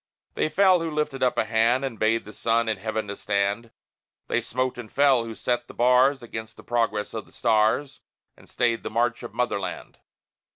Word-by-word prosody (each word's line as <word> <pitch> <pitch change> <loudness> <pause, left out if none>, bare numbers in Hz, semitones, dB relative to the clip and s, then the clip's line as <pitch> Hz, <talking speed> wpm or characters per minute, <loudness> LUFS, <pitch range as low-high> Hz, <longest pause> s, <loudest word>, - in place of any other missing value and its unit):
They - - 0
fell, 185 0 +4
who 165 0 -2
lifted 150 -3 -2
up 125 - +2
a - - +2
hand 115 +4 +2
And 115 -5 -6
bade 115 +1 +1
the 105 - -11
sun 115 0 +1
in 110 -2 0
heaven 110 +1 -3
to 100 - -5
stand; 100 +3 -1 0.6
They 120 - +1
smote 130 +2 -2
and 110 -3 -9
fell, 135 -4 +3
who 115 -1 -7
set 120 +1 -1
the - - -12
bars 125 +2 +4
Against 110 -1 -7
the - - -13
progress 115 -3 -1
of 110 - -6
the - - -21
stars, 110 +5 +1 0.4
And - - -19
stayed 120 -1 0
the - - -5
march 120 +1 0
of 120 -2 -9
Motherland. 120 -6 -3
115 Hz, 200 wpm, -25 LUFS, 110-125 Hz, 0.6 s, fell